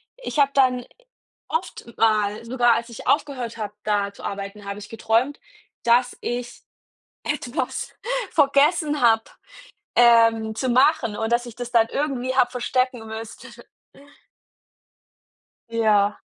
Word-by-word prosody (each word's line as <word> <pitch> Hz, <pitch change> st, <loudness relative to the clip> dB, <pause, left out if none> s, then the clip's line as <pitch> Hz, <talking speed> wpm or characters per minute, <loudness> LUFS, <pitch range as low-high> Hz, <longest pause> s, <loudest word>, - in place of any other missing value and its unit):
ich -, -, -5 dB
habe 280 Hz, -1 st, +4 dB
dann 250 Hz, -3 st, +2 dB, 0.6 s
oft 475 Hz, -, -4 dB
mal, 215 Hz, 0 st, +1 dB
sogar 240 Hz, -1 st, +3 dB
als 235 Hz, +1 st, -4 dB
ich 230 Hz, -, -10 dB
aufgehört 255 Hz, -6 st, 0 dB
habe, 210 Hz, -1 st, -5 dB
da 205 Hz, -1 st, 0 dB
zu -, -, -14 dB
arbeiten, 200 Hz, +1 st, -6 dB
habe 200 Hz, 0 st, -5 dB
ich 205 Hz, -, -10 dB
geträumt, 225 Hz, +5 st, 0 dB, 0.4 s
dass 245 Hz, +1 st, +3 dB
ich 245 Hz, 0 st, -5 dB, 0.6 s
etwas 295 Hz, -2 st, -3 dB, 0.4 s
vergessen 295 Hz, +1 st, +3 dB
habe, 225 Hz, -1 st, +5 dB, 0.7 s
ähm, 230 Hz, -2 st, +5 dB
zu 260 Hz, -, -1 dB
machen 255 Hz, -3 st, +3 dB
und 225 Hz, +2 st, -2 dB
dass 240 Hz, +1 st, +1 dB
ich 235 Hz, -, -9 dB
das 245 Hz, -1 st, -6 dB
dann 230 Hz, -2 st, +3 dB
irgendwie 260 Hz, -3 st, -2 dB
habe 245 Hz, -2 st, +3 dB
verstecken 250 Hz, -1 st, -1 dB
müsste. 225 Hz, +3 st, -8 dB, 2.2 s
Ja. 210 Hz, -3 st, +2 dB
235 Hz, 125 wpm, -23 LUFS, 220-260 Hz, 2.2 s, habe